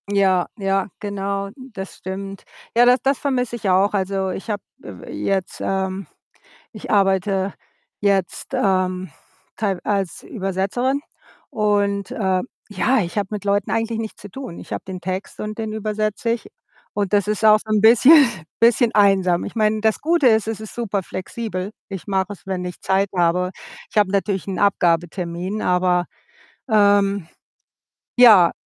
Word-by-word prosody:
Ja, 190 -3 +2
ja, 195 -2 0
genau, 200 -1 -3
das 230 -8 -9
stimmt. 195 +1 -7 0.3
Ja, 240 +1 +6
das 250 +1 +5
das 275 0 +1
vermisse 250 -4 -1
ich 210 -4 -2
auch. 190 +3 +3
Also, 195 -1 -1
ich 195 - -7
habe, 205 -2 -2 0.2
äh, 95 -4 -9
w - - -10
jetzt, 185 - -2
ähm 190 0 -2 0.6
ich 215 - -10
arbeite 195 -1 +2 0.5
jetzt, 195 -3 0
ähm, 185 -2 0 0.5
teilw 195 -4 -1
als 195 -4 -2
Übersetzerin 200 +6 -1 0.5
und, 205 -2 0
äh, 190 -3 0 0.3
ja, 245 +5 +2
ich 175 0 -3
habe 200 -2 0
mit 210 -1 -5
Leuten 200 0 +1
eigentlich 225 0 -1
nichts 220 -1 -6
zu 205 - -10
tun. 255 -5 -8
Ich - - -8
habe - - -4
den 185 -1 -5
Text 185 +2 -5
und 215 0 -5
den 220 -1 -3
übersetze 215 +1 -2
ich 235 - -3 0.5
und 205 -1 -2
das 205 -1 +3
ist 210 +1 0
auch 215 0 +7
so 220 - -15
'n 215 -1 +3
bisschen 255 +6 +7 0.3
bisschen 235 0 +4
einsam. 195 -4 +4
Ich - - -8
meine, 215 -1 +2
das 220 -1 +2
Gute 325 -3 +3
ist, 220 -2 +3
es 225 -1 -3
ist 215 -1 -9
super 205 -5 -2
flexibel. 185 +1 -5 0.2
Ich 195 -1 -7
mache 190 0 -1
es, 185 - -17
wenn 185 -2 -3
ich 180 -1 -7
Zeit 195 +1 +1
habe. 180 +1 +2 0.4
Ich - - -6
habe 205 -2 +4
natürlich 200 -1 -1
'n 190 -2 -3
Abgabetermin, 175 +1 0
aber, 180 0 +2 0.7
ähm 200 -3 +3 0.9
ja. 215 -9 +8
200 Hz, 160 wpm, -21 LUFS, 190-215 Hz, 0.9 s, ja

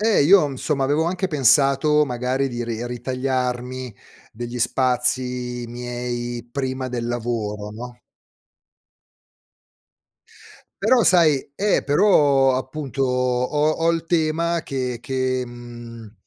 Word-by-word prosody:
Eh, 220 -6 +3
io, 170 0 +5
insomma, 135 +1 -2
avevo 145 +4 +1
anche 185 +2 -1
pensato 145 +1 +4
magari 130 +2 -1
di 120 -1 -4
ri 115 0 -4
ritagliarmi 125 0 -3 0.4
degli 120 +2 -6
spazi 125 0 0
miei 120 0 -5
prima 130 0 -3
del 120 -2 -4
lavoro, 110 -3 -3
no. 120 +3 -9 2.9
Però 240 +1 +4
sai 155 -6 +3
eh, 205 +6 +1
però 145 -5 +4
appunto 135 +1 -3
ho 125 +4 +1
ho 165 +1 0
il 165 -1 -2
tema 165 0 0
che 125 -3 -3
che, 130 0 -1
mhmm, 120 -2 -11
130 Hz, 105 wpm, -22 LUFS, 120-145 Hz, 2.9 s, io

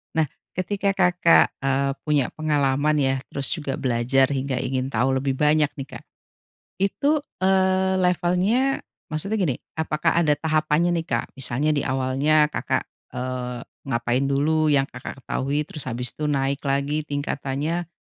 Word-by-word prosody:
nah 160 -1 +2 0.3
ketika 195 +2 -1
Kakak, 180 -3 +4
eee, 135 0 +1
punya 150 -4 +2
pengalaman 150 -1 +1
ya? 135 -1 +2 0.2
Terus 140 -1 -1
juga 145 -5 -2
belajar 130 0 +2
hingga 135 -1 -1
ingin 130 0 -1
tahu 130 +3 +1
lebih 135 0 -1
banyak 150 +1 +3
nih, 135 -1 -6
Kak. - - -17 0.8
Itu, 280 +10 +1 0.2
eee, 190 0 +3
levelnya 185 +9 +2 0.3
maksudnya 170 +8 -2
gini, 170 -10 +1 0.2
apakah 160 +1 0
ada 150 -3 +3
tahapannya 155 +2 +1
nih 165 - -9
Kak? - - -2
Misalnya 135 +3 0
di 145 -2 0
awalnya 135 +4 +2
Kakak, - - -1 0.3
eee, 125 -1 -3 0.3
ngapain 120 +1 0
dulu 155 +3 +2
yang 135 -1 +2
Kakak 125 +2 -8
ketahui 140 +4 -1
terus 150 - -5
habis 125 0 0
itu 155 - -5
naik 135 -1 0
lagi 140 +2 0
tingkatannya. 145 +3 -2
145 Hz, 145 wpm, -24 LUFS, 135-165 Hz, 0.8 s, Kakak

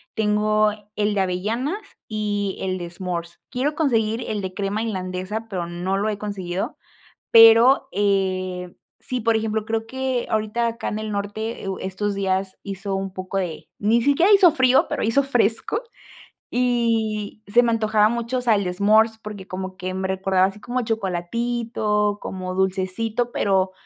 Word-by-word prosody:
tengo 215 0 +2 0.2
el 210 0 +1
de 205 - 0
avellanas, 215 - -1 0.3
y 205 -2 -2
el 185 -1 -2
de 175 -1 -5
smores. 175 -1 -5
Quiero 280 +4 -1
conseguir 230 -7 +1
el 210 -2 -2
de 190 -1 -5
crema 200 +1 -1
irlandesa, 190 0 -3
pero 180 -5 -3
no 175 +3 -2
lo 205 +2 0
he 210 - -2
conseguido. 195 -3 -4 0.6
Pero, 230 +4 +8
eh, 185 -3 0 0.3
sí, 255 -1 -3
por 230 0 +2
ejemplo, 220 -1 -1
creo 225 0 -2
que 260 -1 -2
ahorita 220 +2 0
acá 230 +2 -5
en 215 - -3
el 215 0 -4
norte 205 +3 -4
e - - -4
u 190 - -3
estos 200 +2 -2
días 190 -1 -1
hizo 195 0 -4
un 195 -1 -3
poco 185 +1 -4
de 175 -4 -4
ni 220 +3 +3
siquiera 285 - +4
hizo 385 -5 +7
frío, 260 -3 +4
pero - - -2
hizo 230 +6 +3
fresco 245 - 0 0.7
y 225 -4 0
se 235 +4 +5
me 235 - +2
antojaba 215 -2 +3
mucho, 235 +2 -2
o - - -1
sea, 240 -2 +3
el 200 - 0
de 180 - -2
smores, 215 +4 +4
porque 210 -3 -9
como 185 0 -6
que 185 -1 -4
me 190 0 -2
recordaba 190 0 +2
así 195 +2 -8
como 250 +2 -2
chocolatito 215 +1 -1
como 185 -1 -5
dulcecito, 190 +5 -1
pero 190 -3 +1
210 Hz, 170 wpm, -23 LUFS, 190-230 Hz, 0.7 s, Pero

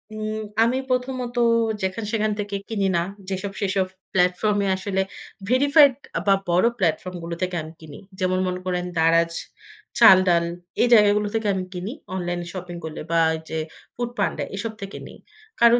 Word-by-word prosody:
উম 215 0 -3 0.2
আমি 245 +3 +2
প্রথমত, 250 -1 -2 0.5
যেখান 190 +4 -2
সেখান 215 -1 +1
থেকে 205 -1 -3
কিনি 200 -3 0
না। - - +2 0.3
যেসব 195 +1 -3
সেসব 190 -1 +1 0.3
প্লাটফর্ম 185 +3 +2
এ - - 0
আসলে 190 0 -1 0.5
ভেরিফাইড, 285 +2 +6 0.3
বা 195 - +7 0.2
বড় 180 +6 +4
প্ল্যাটফর্ম 180 +1 -1
গুলো 170 0 -4
থেকে 180 -1 -1
আমি 160 +1 -10
কিনি। 150 -2 -10 0.2
যেমন 185 0 +1
মনে 180 0 -2
করেন, 180 -1 -1
দারাজ, 165 +1 +3 0.7
চাল-ডাল 185 -6 +7 0.4
এই 245 - +5
জায়গাগুলো 210 -1 +5
থেকে 220 -1 0
আমি 185 -1 -2
কিনি 180 +5 -4 0.2
অনলাইন 175 -1 -2
শপিং 180 -1 -6
করলে 155 - -6
বা 165 - +3 0.2
এই - - -6
যে, 160 - -3 0.4
ফুড 240 0 -2
পান্ডা - - 0
এসব 220 +2 -4
থেকে 195 0 -6
নেই। - - -12 0.4
কারণ 235 +1 +7
195 Hz, 165 wpm, -23 LUFS, 180-220 Hz, 0.7 s, বা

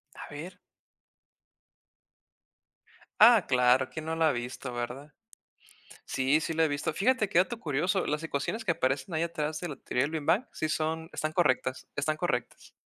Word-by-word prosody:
A - - -9
ver. 170 +6 -8 2.6
Ah, 225 -3 +8
claro, 125 0 +3
quién 160 -1 -7
no 160 0 -2
la 160 -1 +3
ha - - +3
visto, 125 +1 -5
¿verdad? 125 +5 -5 1.0
Sí, 135 +4 +2
sí 165 0 -3
la 160 0 +3
he - - +2
visto. 145 +1 -2
Fíjate, 215 -1 +2
qué 170 - +2
dato 225 +5 +1
curioso. 175 +6 0
Las 150 +2 -1
ecuaciones 160 +9 -3
que 185 - 0
aparecen 135 +5 -1
ahí 160 - 0
atrás 155 -2 -2
de 175 - -4
la 145 - -6
"Theory 125 +2 -1
of 150 - -2
the 160 - -2
Big 145 - -10
Bang" 185 +11 +3
sí 155 - -2
son 160 +1 -2
están 155 0 -2
correctas. 130 -5 +1
Están 155 +2 -1
correctas. 140 -8 -3
155 Hz, 175 wpm, -29 LUFS, 135-170 Hz, 2.6 s, Ah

